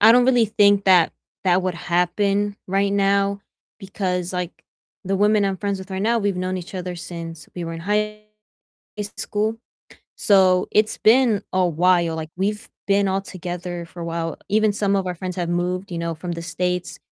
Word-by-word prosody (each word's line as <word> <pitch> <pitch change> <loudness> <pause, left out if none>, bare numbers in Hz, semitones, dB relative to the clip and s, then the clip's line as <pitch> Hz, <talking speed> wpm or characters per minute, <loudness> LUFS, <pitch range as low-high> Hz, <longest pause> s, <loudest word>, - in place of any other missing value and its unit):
I 220 +2 +8
don't 245 +1 +5
really 245 -3 +4
think 200 -1 +4
that 180 -3 +5 0.3
that 185 0 +3
would 185 -1 -1
happen 195 +4 0
right 195 +1 +1
now 200 0 +2 0.4
because, 185 -3 -3
like, 180 -1 -5 0.4
the 195 +1 0
women 210 +1 +3
I'm 195 -1 0
friends 200 0 -2
with 190 +1 -10
right 190 0 -3
now, 230 +2 +2
we've 205 -3 0
known 185 +1 -2
each 180 +1 -8
other 180 -1 -4
since 165 -3 -8
we 175 - -4
were 165 - -5
in 165 - -6
high 210 +3 -1 1.0
school, 215 +2 -1 0.6
so 190 -3 +4
it's 215 0 +2
been 230 -2 +4
a 185 -1 +3
while, 175 0 +2
like, 160 -1 -5
we've 210 +3 -2 0.2
been 200 0 +3
all 190 +1 0
together 175 -2 -6
for 175 - -10
a - - -4
while, 165 -1 -3
even 215 +1 +3
some 200 -1 +1
of 190 -1 0
our 180 - -3
friends 185 +1 -5
have 175 -1 -1
moved, 180 +2 -2
you 170 - -3
know, 170 0 -2
from 175 +2 -5
the 170 - -6
States. 180 +1 -2
190 Hz, 190 wpm, -22 LUFS, 175-200 Hz, 1.0 s, I